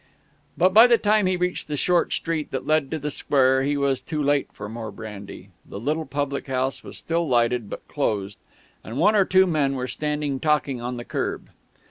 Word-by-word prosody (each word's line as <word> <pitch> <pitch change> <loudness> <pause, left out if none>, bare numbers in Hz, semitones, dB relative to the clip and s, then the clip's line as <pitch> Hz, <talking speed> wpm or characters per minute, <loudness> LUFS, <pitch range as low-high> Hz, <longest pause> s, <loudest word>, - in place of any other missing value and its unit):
But 185 +2 +3
by 225 +4 +9
the 240 -1 +5
time 210 -2 +2
he 185 -1 +1
reached 180 0 -2
the 150 -1 -3
short 175 +4 +2
street 165 -3 -2
that 130 - -4
led 155 -3 +1
to 160 - -2
the 150 0 -4
square 130 -2 +2
he 145 +2 0
was 135 -2 0
too 150 +4 -4
late 145 -1 +1
for - - -8
more 110 0 -6
brandy. 100 -2 -9
The 100 - -9
little 155 +7 -2
public 140 -1 -3
house 130 0 -2
was - - -9
still 170 0 -1
lighted, 120 -3 +1
but - - -8
closed, 100 -1 -2 0.4
and 115 - -7
one 205 +8 +4
or 200 -2 +4
two 190 0 +5
men 150 -6 0
were 130 -1 -3
standing 150 -1 -2
talking 150 -4 0
on 125 +1 -4
the 120 - -7
kerb. - - -4
145 Hz, 205 wpm, -24 LUFS, 125-160 Hz, 0.4 s, by